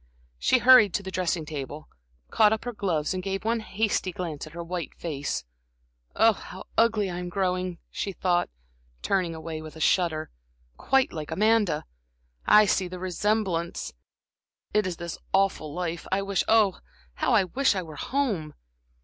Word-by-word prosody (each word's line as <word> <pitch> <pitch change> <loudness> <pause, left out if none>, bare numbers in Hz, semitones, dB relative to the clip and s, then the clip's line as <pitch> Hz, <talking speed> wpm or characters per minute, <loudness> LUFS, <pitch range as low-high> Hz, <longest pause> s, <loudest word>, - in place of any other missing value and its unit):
She 255 - +4
hurried 245 -5 +7
to 200 - -1
the 190 - -6
dressing 175 -3 -1
table, 150 0 -6 0.4
caught 215 -1 +5
up 220 +1 -1
her 245 - -3
gloves 175 -8 -1
and 185 - -3
gave 195 +2 -3
one 230 +1 +1
hasty 210 -3 -1
glance 165 -4 -5
at 155 - -13
her 170 0 -5
white 175 0 -5
face. 145 - -3 0.7
"How 215 -4 +1
ugly 225 -3 +3
I 175 -1 -4
am 180 0 -5
growing," 185 -1 -1
she 200 - -3
thought, 175 -1 0 0.5
turning 180 -4 0
away 160 0 -6
with 155 0 -10
a - - -10
shudder; 160 -1 +1 0.4
"quite 270 - +2
like 155 -2 -5
Amanda! 210 -7 +2 0.6
I 210 0 +7
see 190 -2 +1
the 180 +1 -7
resemblance. 185 -1 -1 0.8
It 210 -2 +2
is 175 -2 -4
this 170 -1 -6
awful 195 -6 +1
life. 170 0 -4
I 195 +1 +1
wish 195 -1 0
oh, 215 -4 +4 0.3
how 255 - 0
I 205 - +5
wish 255 +5 +1
I 185 - -2
were 155 -3 -10
home!" 205 - -1
185 Hz, 165 wpm, -26 LUFS, 165-210 Hz, 0.8 s, hurried